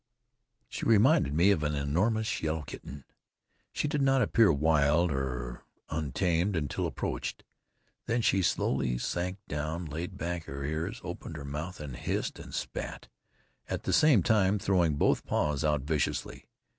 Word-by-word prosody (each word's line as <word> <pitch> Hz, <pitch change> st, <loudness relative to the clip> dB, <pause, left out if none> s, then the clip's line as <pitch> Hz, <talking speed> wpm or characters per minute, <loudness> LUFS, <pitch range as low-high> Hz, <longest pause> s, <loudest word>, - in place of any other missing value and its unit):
She -, -, -6 dB
reminded 115 Hz, -, +4 dB
me 90 Hz, +5 st, +5 dB
of 85 Hz, -, +2 dB
an 75 Hz, 0 st, 0 dB
enormous 105 Hz, +11 st, 0 dB
yellow 80 Hz, 0 st, -1 dB
kitten. 70 Hz, 0 st, -9 dB, 0.7 s
She -, -, -1 dB
did 145 Hz, -1 st, 0 dB
not 135 Hz, -1 st, +4 dB
appear 115 Hz, -6 st, +4 dB
wild 75 Hz, +2 st, +3 dB
or 60 Hz, -3 st, -3 dB, 0.3 s
untamed 85 Hz, +5 st, 0 dB
until 75 Hz, -4 st, -1 dB
approached. -, -, -4 dB, 0.6 s
Then 115 Hz, 0 st, +1 dB
she 95 Hz, -, +3 dB
slowly 65 Hz, -7 st, +1 dB
sank 90 Hz, +8 st, -2 dB
down, 75 Hz, +4 st, -3 dB
laid 80 Hz, +3 st, -5 dB
back 85 Hz, 0 st, -3 dB
her 70 Hz, +1 st, -6 dB
ears, 80 Hz, -, -3 dB
opened 85 Hz, -3 st, -6 dB
her 70 Hz, -, -7 dB
mouth 75 Hz, +6 st, -5 dB
and 70 Hz, -5 st, -6 dB
hissed -, -, -3 dB
and -, -, -10 dB
spat, -, -, -5 dB, 0.6 s
at -, -, -3 dB
the -, -, -1 dB
same 150 Hz, -, +5 dB
time 105 Hz, -1 st, +3 dB
throwing 90 Hz, -6 st, +2 dB
both 70 Hz, -, +2 dB
paws 75 Hz, 0 st, 0 dB
out 75 Hz, -2 st, +2 dB
viciously. 75 Hz, +1 st, -2 dB
80 Hz, 150 wpm, -30 LUFS, 75-95 Hz, 0.7 s, me